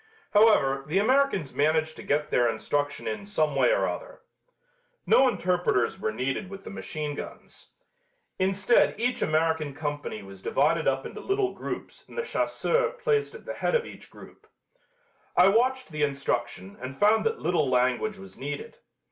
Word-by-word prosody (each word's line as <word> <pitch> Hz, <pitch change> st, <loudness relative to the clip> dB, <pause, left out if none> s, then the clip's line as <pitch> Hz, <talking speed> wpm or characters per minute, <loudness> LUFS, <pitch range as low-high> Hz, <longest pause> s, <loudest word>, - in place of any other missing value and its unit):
However, 145 Hz, -11 st, +4 dB
the 160 Hz, +5 st, 0 dB
Americans 225 Hz, -, +2 dB
managed 155 Hz, +2 st, +1 dB
to -, -, -8 dB
get 150 Hz, +1 st, -1 dB
their 120 Hz, -1 st, +3 dB
instruction 145 Hz, +2 st, -2 dB
in 210 Hz, -, -3 dB
some 155 Hz, -8 st, 0 dB
way 130 Hz, -3 st, +4 dB
or -, -, +2 dB
other. -, -, -6 dB, 0.8 s
No 265 Hz, -, +5 dB
interpreters 180 Hz, -, 0 dB
were 110 Hz, -, -1 dB
needed 135 Hz, -, -3 dB
with 195 Hz, 0 st, -9 dB
the -, -, -8 dB
machine 155 Hz, -7 st, -4 dB
guns. -, -, -9 dB, 0.7 s
Instead 195 Hz, +4 st, +3 dB
each 245 Hz, +1 st, 0 dB
American 155 Hz, -2 st, +1 dB
company 145 Hz, -8 st, -4 dB
was 95 Hz, -1 st, -12 dB
divided 155 Hz, +8 st, +1 dB
up 135 Hz, 0 st, +1 dB
into -, -, -7 dB
little 390 Hz, -1 st, 0 dB
groups -, -, -7 dB
and -, -, -13 dB
a 475 Hz, -, 0 dB
chasseur 485 Hz, +1 st, 0 dB
placed 470 Hz, -3 st, 0 dB
at -, -, -12 dB
the -, -, -4 dB
head -, -, 0 dB
of 475 Hz, 0 st, +1 dB
each -, -, -12 dB
group. -, -, -15 dB, 0.9 s
I 180 Hz, +2 st, +7 dB
watched 255 Hz, +1 st, +1 dB
the 155 Hz, -1 st, -4 dB
instruction 120 Hz, -8 st, -2 dB
and 130 Hz, +1 st, -6 dB
found 215 Hz, +2 st, +4 dB
that 455 Hz, 0 st, -1 dB
little 155 Hz, -, +1 dB
language 130 Hz, -, +1 dB
was 195 Hz, 0 st, -12 dB
needed. 145 Hz, +1 st, -6 dB
160 Hz, 165 wpm, -27 LUFS, 140-220 Hz, 0.9 s, I